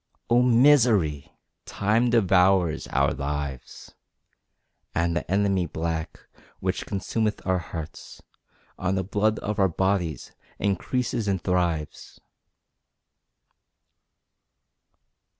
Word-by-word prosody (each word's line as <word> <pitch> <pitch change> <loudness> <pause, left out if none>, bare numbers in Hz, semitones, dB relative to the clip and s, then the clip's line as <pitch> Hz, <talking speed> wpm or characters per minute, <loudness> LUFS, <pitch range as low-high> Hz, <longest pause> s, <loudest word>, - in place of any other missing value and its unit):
Oh 120 +1 +5
misery! 115 - +4 0.4
Time 110 +4 +1
devours 95 -6 +3
our - - +1
lives, 70 -2 -5 1.0
And 85 0 +1
the 85 - -3
enemy 95 -2 +1
black, 80 0 -4 0.4
which 95 +1 -3
consumeth 105 +2 -2
our 95 -1 +1
hearts 80 -2 -8 0.6
On 95 +1 0
the 95 - -1
blood 105 +3 0
of 105 +1 -3
our 95 -1 +4
bodies, 90 -2 -1 0.3
increases 115 +3 -1
and 95 -2 0
thrives! 85 -4 -2
95 Hz, 90 wpm, -25 LUFS, 85-105 Hz, 1.0 s, Oh